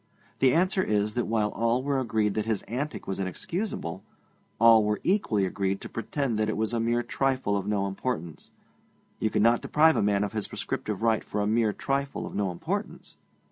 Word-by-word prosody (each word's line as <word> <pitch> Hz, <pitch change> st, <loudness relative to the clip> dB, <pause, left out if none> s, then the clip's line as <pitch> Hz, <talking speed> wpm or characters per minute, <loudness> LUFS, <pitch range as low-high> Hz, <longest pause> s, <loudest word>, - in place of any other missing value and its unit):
The 130 Hz, -1 st, +5 dB
answer 185 Hz, +5 st, +2 dB
is, 105 Hz, -, 0 dB
that 120 Hz, 0 st, -1 dB
while 110 Hz, -1 st, +1 dB
all 115 Hz, +3 st, 0 dB
were 140 Hz, -1 st, 0 dB
agreed 110 Hz, -4 st, 0 dB
that 110 Hz, +1 st, -2 dB
his 110 Hz, -3 st, 0 dB
antic 140 Hz, +6 st, -4 dB
was 95 Hz, -, -4 dB
inexcusable, 95 Hz, -, -3 dB, 0.6 s
all 115 Hz, -1 st, +7 dB
were 105 Hz, 0 st, 0 dB
equally 115 Hz, -, +2 dB
agreed 95 Hz, 0 st, -1 dB
to -, -, -7 dB
pretend 120 Hz, -1 st, -2 dB
that 110 Hz, 0 st, +1 dB
it -, -, -2 dB
was 110 Hz, +1 st, -1 dB
a 115 Hz, -, +1 dB
mere 120 Hz, +1 st, +1 dB
trifle 130 Hz, -4 st, 0 dB
of 100 Hz, 0 st, -2 dB
no 100 Hz, -2 st, 0 dB
importance; 95 Hz, -4 st, -4 dB, 0.7 s
you 110 Hz, -, +1 dB
cannot 115 Hz, +3 st, +3 dB
deprive 160 Hz, +1 st, +4 dB
a -, -, +2 dB
man 100 Hz, 0 st, +2 dB
of 105 Hz, -, -3 dB
his 110 Hz, -2 st, -2 dB
prescriptive 105 Hz, 0 st, -4 dB
right 115 Hz, -2 st, +2 dB
for -, -, -4 dB
a 105 Hz, -, +1 dB
mere 110 Hz, 0 st, +2 dB
trifle 140 Hz, +5 st, -2 dB
of -, -, -8 dB
no 100 Hz, -2 st, 0 dB
importance. 85 Hz, -, -5 dB
110 Hz, 195 wpm, -27 LUFS, 105-125 Hz, 0.7 s, all